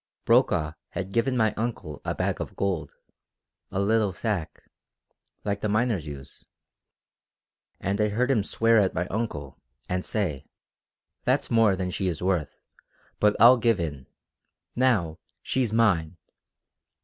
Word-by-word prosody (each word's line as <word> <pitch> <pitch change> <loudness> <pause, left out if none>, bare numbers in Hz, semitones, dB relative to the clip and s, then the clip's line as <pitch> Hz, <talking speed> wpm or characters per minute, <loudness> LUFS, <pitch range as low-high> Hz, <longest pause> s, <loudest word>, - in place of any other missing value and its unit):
Brokaw 75 0 +3 0.2
had 95 0 -5
given 125 +3 +1
my 110 -2 +2
uncle 110 -10 -4
a - - -2
bag - - -1
of - - -6
gold, 90 -7 -2 0.7
a 95 - -3
little 105 0 +2
sack, 90 -4 -3 0.8
like 100 -1 -2
the 105 - -1
miners 110 -6 0
use, 70 -2 -9 1.4
and 100 +2 -1
I 105 - +2
heard 125 +6 +1
him 110 -6 +2
swear 115 +2 +3
at 95 -3 +1
my 85 +1 0
uncle, 75 - -4 0.3
and 90 0 -2
say: 85 -11 -2 0.8
'That's - - 0
more 115 -4 +4
than 90 -1 -3
she 95 0 -2
is 85 -4 -2
worth 90 -4 -1 0.6
but 105 0 +4
I'll 120 +4 +8
give 115 -3 +2
in. 75 -6 -4 0.7
Now 110 -11 +1 0.2
she's 125 -5 0
mine!' 90 -8 +2
100 Hz, 135 wpm, -26 LUFS, 85-115 Hz, 1.4 s, I'll